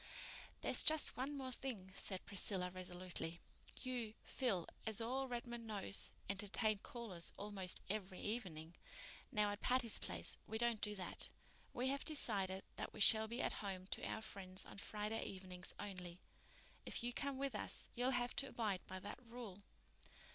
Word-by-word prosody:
"There's - - +7
just 315 -1 +5
one 275 +3 -2
more 260 -1 -3
thing," 225 -8 -4
said 190 -1 -3
Priscilla 185 -2 +2
resolutely. 180 -2 -4 0.4
"You, 240 -4 -2
Phil, 200 -10 +1 0.2
as 220 -2 +1
all 260 +4 0
Redmond 240 -1 -4
knows, 200 -2 +1 0.2
entertain 205 +2 +2
callers 205 -7 -2
almost 200 -3 0
every 190 -2 -2
evening. 175 -8 -3 0.6
Now, 210 -1 +3
at 205 - -5
Patty's 250 -3 +4
Place - - -2
we 220 - -2
can't 235 -2 +2
do 210 0 +3
that. 185 -2 0 0.4
We 255 +2 +1
have 275 +1 0
decided 195 - +1
that - - -3
we - - -8
shall 220 +1 +10
be 235 +3 -1
at - - +1
home 190 -3 -3
to - - -1
our 220 - -2
friends 185 -3 -3
on - - -9
Friday 210 +2 -2
evenings 185 -2 -1
only. 180 -3 -5 0.6
If - - -2
you 245 0 -1
come 280 0 -1
with 275 -1 0
us 210 - -1
you'll 245 +2 +2
have 245 -2 +1
to 275 - +4
abide 210 -5 0
by 185 0 -5
that 205 +6 -7
rule." 230 -5 -7
210 Hz, 160 wpm, -42 LUFS, 190-240 Hz, 0.6 s, shall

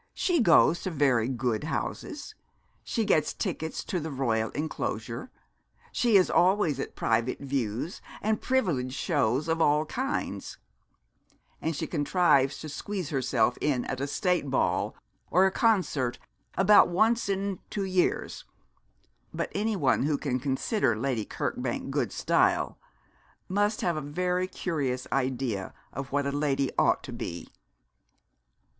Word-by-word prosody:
'She 355 -3 +1
goes 170 -5 +5
to - - -2
very 135 -8 +2
good 125 -1 -1
houses. 295 - -4 0.5
She 225 -3 -1
gets 155 -6 +2
tickets 160 0 -3
for 180 - -2
the 160 0 -4
Royal 115 -6 0
enclosure. 120 - -3 0.6
She 235 -4 +4
is 185 - +4
always 180 -6 +3
at - - -5
private 115 +2 0
views, 135 - -3 0.2
and 215 +1 0
privileged 155 - 0
shows 140 -3 +1
of 165 0 0
all 150 0 +3
kinds; 265 - -3 1.0
and 160 0 -1
she - - -2
contrives 145 -3 +2
to 155 - -6
squeeze 185 +1 -4
herself 125 -4 +1
in 135 -5 +1
at 130 - -4
a 140 - -1
State 180 -1 0
ball 130 - 0 0.3
or 185 +2 +5
a 190 - +3
concert 180 - +1 0.4
about 195 +3 +7
once 220 +5 +2
in 195 -1 -1
two 200 -2 -2
years; 185 -1 0 0.9
but - - -3
any 215 +1 0
one 140 -4 +2
who 150 -2 +1
can 130 -4 -1
consider 135 - 0
Lady 120 -3 -1
Kirkbank - - -3
good - - 0
style - - +1 0.7
must 205 +3 +1
have 170 -3 0
a - - -2
very 180 +5 -1
curious 140 -9 -2
idea 125 -7 -1 0.2
of 135 0 -6
what 145 0 +1
a 140 - 0
lady 140 -2 0
ought - - +3
to - - -7
be.' 85 -1 -6
150 Hz, 140 wpm, -28 LUFS, 130-185 Hz, 1.0 s, about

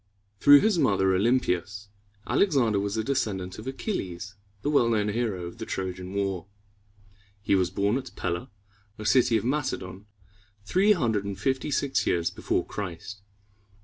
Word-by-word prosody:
Through 145 0 +8
his 210 -5 +2
mother, 95 -5 +3
O 95 - +2
lym´pi 115 -5 +2
as, 100 +2 -11 0.4
Alexander 130 - +2
was 100 +2 -2
a 110 - 0
descendant 105 -9 -2
of 110 - -9
Achilles, 100 - -4 0.3
the 145 - 0
well 120 -5 +4
known 105 -2 +1
hero 105 -5 -2
of 85 +6 -9
the 110 - -4
Trojan 95 0 -4
War. 95 -2 -2 0.9
He 100 - 0
was 95 -2 +3
born 100 +6 0
at 130 - -9
Pel´la, 85 0 -3 0.5
a 105 - -7
city 120 -1 +4
of 110 - -4
Macedon, 105 -8 -3 0.6
three 195 - +4
hundred 115 - 0
and 100 -1 -5
fifty 130 +7 -1
six 140 -1 0
years 85 -1 +1
before - - -1
Christ. 100 +1 -6
105 Hz, 160 wpm, -27 LUFS, 95-130 Hz, 0.9 s, Through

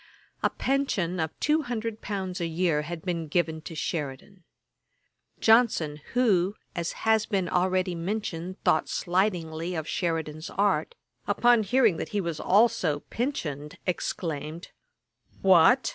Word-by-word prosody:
A - - +3
pension 205 -11 -1
of 160 -1 -3
two 305 +2 +2
hundred 230 -4 -4
pounds 190 -3 -4
a 170 - 0
year 165 -2 +1
had 160 +2 -6
been 170 -3 -2
given 160 0 0
to 165 - -8
Sheridan. 155 +4 -4 1.0
Johnson, 220 -10 +3
who, 205 -6 +3 0.2
as 170 -1 -2
has 220 -1 +3
been 195 -4 0
already 185 +1 +1
mentioned, 180 0 -4
thought 155 - +2
slightingly 175 -2 -1
of 160 -2 -3
Sheridan's 160 -3 -2
art, 205 - 0 0.3
upon 240 -1 +4
hearing 220 -3 +3
that - - -4
he 210 - -1
was 170 -4 -3
also 185 -8 +3
pensioned, 150 - -3
exclaimed, 165 -2 -3 0.7
'What! 190 +7 +6
180 Hz, 130 wpm, -27 LUFS, 160-215 Hz, 1.0 s, What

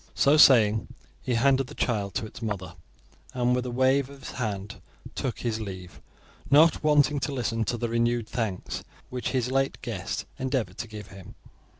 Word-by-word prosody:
So 140 +1 +4
saying 110 -8 +6 0.3
he 125 - -1
handed 135 +2 +3
the - - -11
child 105 -5 -1
to 120 - -1
its 110 - -11
mother, 100 -5 -4 0.6
and 125 0 +2
with 125 0 -2
a - - -3
wave 130 +2 +2
of 140 -1 -11
the - - -8
hand 105 -3 -4 0.3
took 125 - -3
his 115 -2 -1
leave, 90 -7 -8 0.5
not 155 +5 +5
waiting 150 -1 +4
to 135 +1 -2
listen 115 -4 -1
to 120 - -1
the 120 - -2
renewed 115 0 0
thanks 115 -6 -3 0.3
which 125 -1 -3
his 125 -1 -1
late 135 0 0
guest - - -4
endeavoured 130 -3 -2
to 120 - -4
give 105 -2 -9
him. 95 -1 -12
120 Hz, 180 wpm, -27 LUFS, 110-130 Hz, 0.6 s, saying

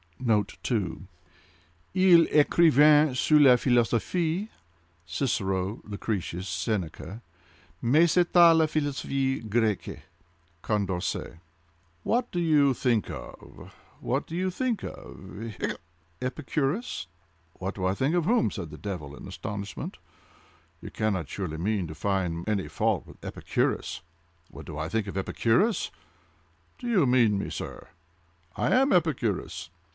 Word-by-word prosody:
(*2) 110 -4 +3 0.2
{*2} 110 -7 -2 0.9
Ils 180 -3 +6
ecrivaient 150 -2 +5
sur 150 +4 +4
la 135 -4 +8
Philosophie 150 - +1 0.6
(Cicero, 95 0 -1
Lucretius, 100 -3 -4
Seneca) 95 +1 -3 0.6
mais 150 +8 +4
c'etait 175 -1 +6
la 160 -1 +4
Philosophie 135 -3 -1
Grecque.—Condorcet. 90 -4 -3 0.7
"What 245 +2 0
do 175 - -2
you 150 -5 +4
think 120 -3 +1
of—what 135 +4 -7
do 165 - -6
you 185 +1 0
think 245 +2 -2
of—hiccup!—Epicurus?" 110 - -5 0.5
"What 95 +2 -5
do 95 - -5
I 95 +1 +1
think 135 +8 0
of 175 -3 +1
whom?" 230 +3 +2
said 90 -7 -6
the 75 - -10
devil, 80 -8 -6
in - - -10
astonishment, 100 -2 -6 0.8
"you - - -8
cannot 100 -9 -1
surely 85 -6 -4
mean 95 +1 -1
to 80 - -8
find 90 0 -1
any 105 -3 0
fault - - -1
with - - -16
Epicurus! - - -2 0.5
What - - -11
do - - -7
I 75 +1 -2
think 105 +3 -1
of 100 - -5
Epicurus! 120 - +1 0.9
Do 245 - -7
you 195 - +3
mean 120 -5 +3
me, - - -3
sir?—I 85 0 -8
am 270 +2 +4
Epicurus! 120 - 0
110 Hz, 115 wpm, -27 LUFS, 95-155 Hz, 0.9 s, la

